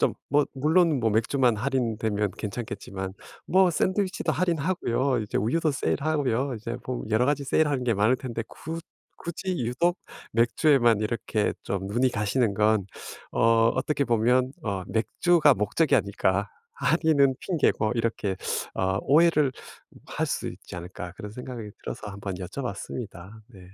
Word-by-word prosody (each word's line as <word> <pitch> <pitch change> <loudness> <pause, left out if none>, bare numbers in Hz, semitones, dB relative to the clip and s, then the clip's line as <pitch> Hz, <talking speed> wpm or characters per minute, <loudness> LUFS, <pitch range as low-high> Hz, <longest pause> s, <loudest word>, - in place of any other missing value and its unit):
좀 - - +2
뭐 145 +1 +3
물론 155 +1 +3
뭐 110 -1 +2
맥주만 120 +2 +2
할인되면 110 -4 0
괜찮겠지만 100 -3 -5 0.3
뭐 185 0 +4
샌드위치도 190 +3 0
할인하고요. 150 -7 0
이제 105 - -4
우유도 155 +10 +1
세일하고요. 140 -2 0
이제 115 +2 -5
뭐 125 -1 -3
여러 115 +4 +3
가지 145 -1 0
세일하는 145 -2 +1
게 120 - +2
많을 110 +6 +3
텐데 120 -3 -4
굳 165 +2 -6 0.4
굳이 180 +2 -4
유독 170 +10 +1 0.3
맥주에만 120 0 +4
이렇게 110 -1 -1
좀 95 -1 -3
눈이 120 +5 +2
가시는 105 +1 0
건 105 -1 +2 0.5
어 115 0 +4
어떻게 140 +2 0
보면 125 +2 +2
어 100 -4 -2
'맥주가 150 - +3
목적이 135 +8 +2
아닐까 100 -2 0 0.2
할인은 160 - +3
핑계고.' 145 - +1
이렇게 110 -4 -1 0.4
아 95 0 0
오해를 150 -2 +4 0.5
할 - - -2
수 - - -2
있지 - - -9
않을까 90 0 -7
그런 105 +3 -8
생각이 120 -2 -7
들어서 105 - -6
한번 100 -1 -5
여쭤봤습니다. 100 -1 -6 0.2
네. 105 -6 -15
120 Hz, 320 characters per minute, -26 LUFS, 105-145 Hz, 0.5 s, 뭐